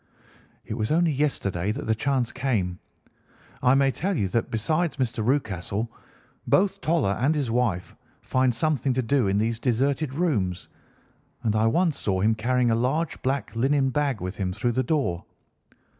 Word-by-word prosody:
"It - - -5
was 110 +1 -2
only 165 +1 +3
yesterday 105 -10 -1
that 140 - -5
the 110 - +2
chance 125 +1 0
came. 105 -9 -1 0.8
I 125 +1 +4
may 135 0 +3
tell 190 +5 -2
you 100 -5 0
that, 115 +4 -1
besides 155 +10 0
Mr. 120 -3 -1
Rucastle, 110 -3 -1 0.6
both 200 0 +2
Toller 155 -10 +1
and 145 +5 +3
his 140 -6 -1
wife 115 -7 -1 0.3
find 130 -2 +1
something 140 0 +1
to 130 +1 0
do 125 -2 +2
in 95 +1 +1
these 115 +2 0
deserted 135 +4 0
rooms, 110 - -1 0.8
and 110 -2 +1
I 110 +1 +3
once 165 +6 +1
saw 95 -2 0
him 110 +4 +3
carrying 120 +2 +1
a - - +3
large 135 +7 -1
black 135 -2 -2
linen 135 +2 +2
bag 140 -5 0
with 90 +2 -5
him 95 -2 -2
through 120 +6 0
the 130 +2 +1
door. 130 - -1
125 Hz, 170 wpm, -25 LUFS, 110-140 Hz, 0.8 s, I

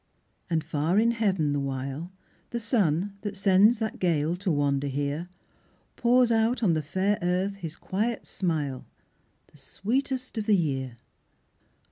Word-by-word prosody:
And 160 -2 +1
far 155 +6 0
in 230 +2 +4
heaven, 190 -10 +1
the 145 - 0
while, 140 +5 -4 0.4
The 235 - -3
sun, 200 - 0
that 205 -1 -5
sends 200 +4 +5
that 220 0 -3
gale 165 -2 +1
to 195 +1 -2
wander 145 -1 +1
here, 145 +5 -2 0.7
Pours 245 0 +4
out 230 +2 +2
on 180 -6 +4
the 155 - 0
fair 190 +7 0
earth 185 +3 0
his 165 -4 -6
quiet 220 +5 -2
smile, 150 -8 -2 0.6
The - - -19
sweetest 255 - -2
of 210 - -4
the 210 - +5
year. 135 -7 -2
185 Hz, 145 wpm, -27 LUFS, 150-220 Hz, 0.7 s, sends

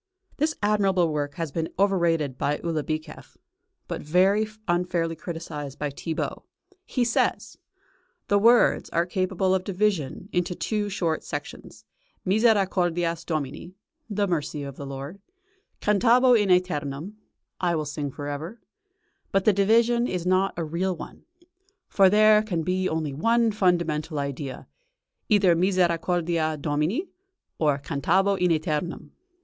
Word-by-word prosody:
This 310 +2 0
admirable 195 -4 +2
work 145 -1 -2
has 165 -4 -4
been 160 +2 -2
overrated 170 -8 +1
by 145 +3 -1
Ulibicheff, 155 -1 -4 0.5
but 170 - -4
very 190 +7 +3 0.2
unfairly 175 -2 0
criticised 150 -5 -7
by 145 -1 -3
Thibaut. 160 +3 -4 0.4
He 250 -2 0
says: 235 - -1 0.7
The 205 - +3
words 235 +3 +4
are 170 +1 +1
capable 185 +1 0
of 190 -1 +1
division 190 -5 -1
into 180 0 -1
two 210 +1 -2
short 165 -5 -1
sections: - - -8 0.4
Misericordias 185 -5 +2
Domini 155 +3 -4 0.3
(the 205 -1 0
mercy 150 -4 -2
of 140 -1 -7
the 140 - -8
Lord), 140 +7 -7 0.6
cantabo 240 +5 +4
in 210 -4 +3
æternum 175 -1 0 0.5
(I 175 -2 +1
will 155 -1 -2
sing 145 0 -4
for 145 +2 -8
ever), 155 +10 -5 0.7
but 195 -1 +1
the 215 - +5
division 230 +4 +3
is 180 -2 -3
not 185 +1 +1
a 170 - -1
real 175 +4 -1
one. - - -10 0.6
For 195 -2 +5
there 215 +1 +6
can 180 -7 -2
be 185 +2 0
only 155 -3 -2
one 230 +9 +2
fundamental 170 -6 0
idea 140 -1 -4 0.6
either 200 -5 +4
"Misericordias 170 -3 +1
Domini" 155 - -1 0.5
or 150 -3 +2
"cantabo 175 +8 +1
in 180 -1 +1
æternum." 155 +1 -2
175 Hz, 130 wpm, -25 LUFS, 155-200 Hz, 0.7 s, there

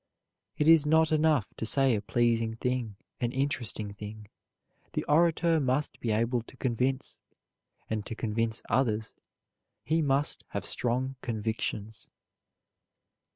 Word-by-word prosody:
It 150 - +1
is 165 -2 +8
not 160 +1 +3
enough 155 -7 +2
to - - -4
say 135 +3 +3
a 105 - 0
pleasing 115 0 +1
thing, 125 -3 -2 0.2
an 120 -1 0
interesting 130 -7 -2
thing, 105 0 -9 0.6
the - - -1
orator 165 +1 +3
must 135 +1 0
be 120 - -3
able 115 +3 +1
to 125 +3 -16
convince; 130 +2 -1 0.7
and 110 -1 -2
to 115 - -5
convince 115 0 -1
others 110 -4 0 0.7
he 160 +1 +1
must 140 0 +1
have - - -3
strong 130 +2 -1
convictions. 110 -2 -3
125 Hz, 125 wpm, -29 LUFS, 110-145 Hz, 0.7 s, is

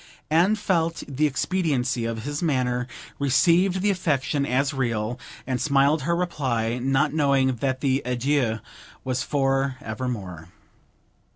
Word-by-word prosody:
Anne 175 +7 +4
felt 170 -6 0
the 145 +2 +1
expediency 135 -6 0
of 115 -1 -3
his 145 +2 -4
manner, 125 -6 0 0.3
received 170 +8 +3
the 205 - +3
affectation 145 -5 0
as 140 +3 +1
real, 120 -2 -2 0.3
and 130 -1 -2
smiled 140 +1 +3
her 170 +6 0
reply, 125 -9 -1
not 135 +3 +1
knowing 135 -4 +2
that 130 +2 -1
the 135 -1 +1
adieu 125 -1 0 0.5
was 130 -1 -1
for 135 -1 0
evermore. 105 -8 -5
135 Hz, 125 wpm, -24 LUFS, 125-155 Hz, 0.5 s, Anne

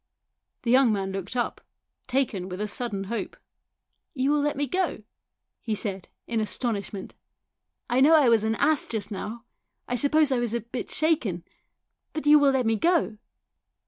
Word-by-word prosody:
The 235 - 0
young 255 -2 +5
man 195 -2 -1
looked 195 +4 -5
up, 245 - -2 0.5
taken 240 -8 -1
with 180 +1 -6
a 210 - -1
sudden 210 -3 -2
hope. 225 +4 -4 0.4
" - - -52
You 270 +1 +1
will 295 0 +2
let 295 -1 -1
me 290 - +1
go? 345 - -1 0.3
" - - -59
he 220 - -2
said, 195 -3 -4 0.2
in 230 -2 -1
astonishment. 210 -3 -3 0.4
" - - -60 0.3
I 245 - +1
know 310 +4 +7
I 295 -5 +5
was 230 -2 +4
an 220 0 0
ass 310 +5 +2
just 215 -2 -4
now. 220 +4 -6 0.4
I - - -3
suppose 285 +4 +3
I 255 - +2
was 235 -1 -1
a 235 - -1
bit 235 +3 -6
shaken. 245 - 0 0.7
But 310 - -4
you 300 0 +7
will 285 -1 +5
let 265 -2 +1
me 225 0 +2
go 330 -8 +1
235 Hz, 185 wpm, -26 LUFS, 210-280 Hz, 0.7 s, know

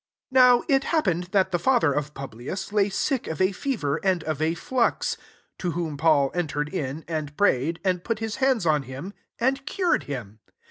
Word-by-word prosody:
8 - - -18
Now 250 -2 +6
it 275 -3 +3
happened 180 - +1
that 190 0 +1
the 175 - +1
father 235 - +3
of 150 +1 -3
Publius 135 - -6
lay 205 -1 +3
sick 255 +6 -1
of 160 - -4
a 185 +1 +3
fever, 185 - -2
and 185 -4 +1
of 155 -2 -3
a 160 +1 +1
fiux: 235 +7 0 0.4
to 180 - -1
whom 165 -3 -3
Paul 145 -2 +3
entered 150 -4 -2
in, 140 +3 -3
and 155 -3 -4
prayed, 165 -4 +2
and 180 -2 +1
put 230 -2 -1
his 220 +1 -4
hands 260 -7 +2
on 155 -2 +3
him, 135 +9 -8 0.3
and 270 +3 +1
cured 360 0 +1
him. 115 -7 -6
175 Hz, 190 wpm, -25 LUFS, 150-225 Hz, 0.4 s, Now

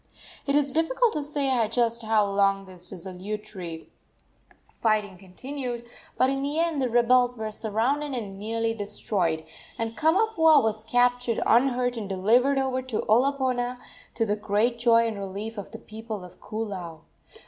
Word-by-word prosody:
It 280 - +2
is 285 -2 +3
difficult 435 - +2
to 300 - -1
say 275 -5 +1
just 235 0 0
how 220 -1 +2
long 195 0 +1
this 180 -2 -8
desultory 190 -2 -6 0.9
fighting 215 -3 0
continued, 240 +6 -6 0.3
but 255 - +4
in 270 0 -1
the 285 +2 -2
end 330 -3 +1
the 255 - +1
rebels 245 +1 +3
were 220 -1 -4
surrounded 245 +8 -1
and 200 -5 -5
nearly 225 +2 -1
destroyed, 185 -6 -2 0.3
and 225 0 -3
Kamapuaa 320 - +4
was 220 0 -1
captured 245 0 +2
unhurt 245 0 +3
and 210 -3 -5
delivered 235 +9 +3
over 265 -1 0
to 260 -4 -3
Olopana, 250 +1 +2 0.4
to 225 - +1
the 205 -1 0
great 215 +3 0
joy 230 -1 +5
and 220 -3 -3
relief 200 +3 -5
of 200 - -8
the 225 - -8
people 220 -2 -7
of 180 - -15
Koolau. 190 -7 -5
230 Hz, 150 wpm, -26 LUFS, 205-260 Hz, 0.9 s, joy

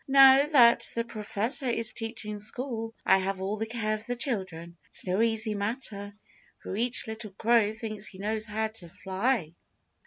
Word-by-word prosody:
"Now 270 0 +8
that 245 -6 +5
the 230 - 0
Professor 230 +4 0
is 230 -2 +1
teaching 225 -2 -5
school, 225 +1 -4
I 190 - +5
have 190 0 -2
all 195 +3 -2
the 220 +1 -3
care 220 -2 -2
of 215 +1 -6
the 245 - -2
children. 190 - -4
It's - - -1
no 185 +3 0
easy 225 -1 +2
matter, 205 -1 -4 0.5
for - - -5
each 235 +3 0
little 220 0 -7
crow 225 0 +2
thinks 215 -1 -4
he 190 - -11
knows 215 +2 -3
how 220 +1 -2
to 215 -6 -12
fly." 190 -1 -1
220 Hz, 175 wpm, -28 LUFS, 205-235 Hz, 0.5 s, Now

